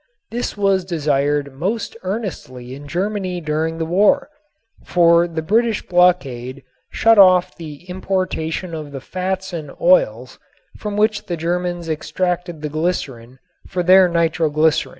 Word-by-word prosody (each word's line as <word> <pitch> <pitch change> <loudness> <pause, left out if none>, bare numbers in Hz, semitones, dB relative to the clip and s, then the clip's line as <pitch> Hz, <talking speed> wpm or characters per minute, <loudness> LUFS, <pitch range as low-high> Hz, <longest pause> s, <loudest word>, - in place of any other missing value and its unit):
This 240 -2 -3
was 195 -2 +2
desired 145 -4 0
most 195 +13 -3
earnestly 180 - -5
in 145 +2 -10
Germany 185 +2 -2
during 160 0 -2
the 165 - -2
war, 210 - +2 0.5
for 170 -1 +4
the 160 -2 -4
British 225 +5 +1
blockade 140 -9 +1 0.3
shut 225 -1 +4
off 185 -1 +5
the 160 0 -10
importation 185 -2 -3
of 150 -3 -7
the 135 - -5
fats 185 +5 -4
and 160 -3 -5
oils - - +2 0.4
from 210 -1 -4
which 215 0 +1
the 175 - -3
Germans 175 +1 -2
extracted 175 +1 -3
the 150 - -2
glycerin 140 -7 -3 0.3
for 180 - -2
their 185 +1 +6
nitroglycerin. 160 -2 +1
175 Hz, 130 wpm, -19 LUFS, 155-190 Hz, 0.5 s, their